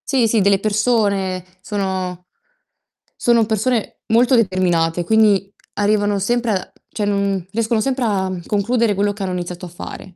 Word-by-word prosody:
Sì, 260 -5 +3
sì, 220 -1 +2
delle 195 0 +3
persone. 200 -3 0 0.2
Sono 185 -3 -3 0.9
sono 235 -2 +3
persone 220 +1 -1
molto 235 +3 +3
determinate, 180 -5 +1
quindi 205 -1 +3 0.2
arrivano 205 0 +1
sempre 240 +3 0
a 190 -3 -3 0.2
cioè 210 - -3
non 200 -3 0
riescono 225 +1 0
sempre 265 +1 -1
a 190 -3 0 0.2
concludere 215 +1 +1
quello 205 +1 +1
che 200 - -10
hanno 185 -1 -2
iniziato 180 0 -5
a - - -11
fare, 180 +1 -9
205 Hz, 150 wpm, -19 LUFS, 190-225 Hz, 0.9 s, Sì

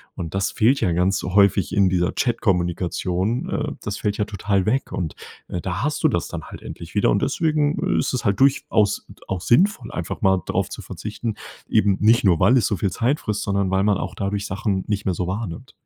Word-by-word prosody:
Und 85 0 -5
das 95 +1 0
fehlt 125 +6 +2
ja 90 - +2
ganz 90 +4 +1
häufig 100 +1 +3
in 100 -2 +4
dieser 90 0 +1
Chatkommunikation. 95 -1 -1
Äh, - - -2
das - - -4
fällt 105 0 -2
ja 105 - 0
total 100 -2 -1
weg 130 +6 0
und, 85 -5 -3 0.3
äh, 90 - -4
da 95 +4 -3
hast 150 +3 -1
du 155 - +5
das 85 - -1
dann - - -6
halt - - -10
endlich - - -9
wieder - - +3
und - - +1
deswegen 155 -3 +1
ist - - 0
es 125 - -2
halt 100 +3 +1
durchaus 110 -6 +2 0.2
auch 95 - -1
sinnvoll, 190 - +2
einfach 90 - -4
mal 95 -2 +3
darauf - - 0
zu - - -7
verzichten, 110 +1 -5 0.3
eben 105 -3 +3
nicht 115 +2 +4
nur, 90 -4 +4
weil 130 - +5
es 120 - +2
so 105 - 0
viel 95 +2 0
Zeit 125 +10 0
frisst, 105 -1 -2
sondern 100 -1 0
weil 95 0 +2
man 105 -1 +3
auch - - -5
dadurch 100 0 -2
Sachen 95 -1 -1
nicht 105 -1 -2
mehr 95 - +1
so 90 0 -3
wahrnimmt. 95 -2 -5
100 Hz, 215 wpm, -22 LUFS, 95-115 Hz, 0.3 s, du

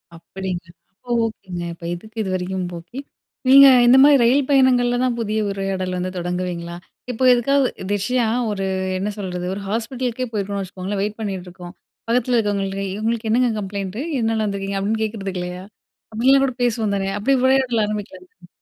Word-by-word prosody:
அப்டிங்களா! 175 0 -6 0.2
அப்ப 245 - -10
ஓகேங்க. 185 -5 -6
இப்ப 170 0 -11
எதுக்கு 215 +6 -10
இதுவரைக்கும், 185 0 -2
ஓகே. 175 +11 -10 0.5
நீங்க 275 +1 +10 0.2
இந்த 250 +2 +7
மாரி 290 0 +7
ரயில் 260 +3 +3
பயணங்கள்ல 250 -3 +4
தான் 250 -2 +1
புதிய 215 -1 -1
உரையாடல் 190 -2 -3
வந்து 185 +1 -3
தொடங்குவீங்களா? 175 -1 -3 0.4
இப்ப 245 +2 -3
எதுக்காவது 275 +3 +2 0.2
ஒரு - - -6
விஷயம் 230 +3 0
ஒரு 195 -2 -2 0.3
என்ன 200 +3 -2
சொல்றது? 180 -3 -4
ஒரு 200 - -5
ஹாஸ்பிட்டலுக்கே 245 +2 -2
போயிருக்கோம்னு 200 -1 -2
வச்சுக்கோங்களேன். 190 +2 -4
வெயிட் 210 +2 -3
பண்ணிட்டு 190 -4 -4
இருக்கோம். 175 0 -11 0.3
பக்கத்ல 245 +1 +1
இருக்கிறவங்கிட்ட, 195 -2 -1 0.2
"உங்களுக்கு 225 0 -1
என்னங்க 245 +1 +3
கம்ப்ளைண்ட்டு? 200 +2 -4 0.2
எத்னால 225 -1 0
வந்துருக்கீங்க?" 200 -1 -3
அப்டின்னு 220 +3 -1
கேக்றதுக்கு 195 -4 -4
இல்லையா? 180 +1 -6 0.5
அப்டிலாம் 265 +5 +4
கூட 260 - -2
பேசுவோம் 220 -4 0
தானே? 195 0 -1
அப்டி 270 +7 +1
உரையாடல் 260 -4 +3
ஆரம்பிக்கலால்ல. 185 -4 -8
205 Hz, 155 wpm, -21 LUFS, 185-240 Hz, 0.5 s, நீங்க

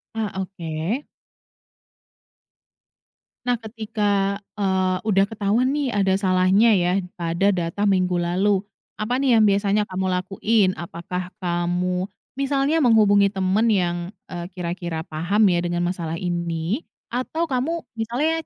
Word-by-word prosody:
Ah, 220 -2 -2
oke. 180 - -4 2.4
Nah 245 -2 +1
ketika, 220 0 -6 0.6
eee, 190 -1 +1
udah 195 -2 +4
ketahuan 220 +3 +1
nih 285 -4 0
ada 195 -3 +2
salahnya 190 +2 +3 0.2
ya 175 - +2 0.3
pada 170 +4 +2
data 175 +1 -2
minggu 185 -3 +2
lalu. 185 +3 +1 0.3
Apa 240 +4 -1
nih 265 -3 +4
yang 220 - +5
biasanya 200 0 +3
kamu 190 0 -2
lakuin? 195 +2 +1
Apakah 175 +2 -5 0.2
kamu 180 +1 0 0.3
misalnya 275 +3 +1
menghubungi 210 -6 +5
teman 195 +3 +1
yang, 180 -5 +2 0.3
e - - -5 0.2
kira-kira 170 -2 -4
paham 170 +8 0
ya 175 - +2
dengan 175 0 -1
masalah 170 -2 -3
ini, 170 - -2 0.3
atau 255 +7 -1
kamu 315 +7 -1 0.2
misalnya 245 +8 0
195 Hz, 120 wpm, -23 LUFS, 175-220 Hz, 2.4 s, yang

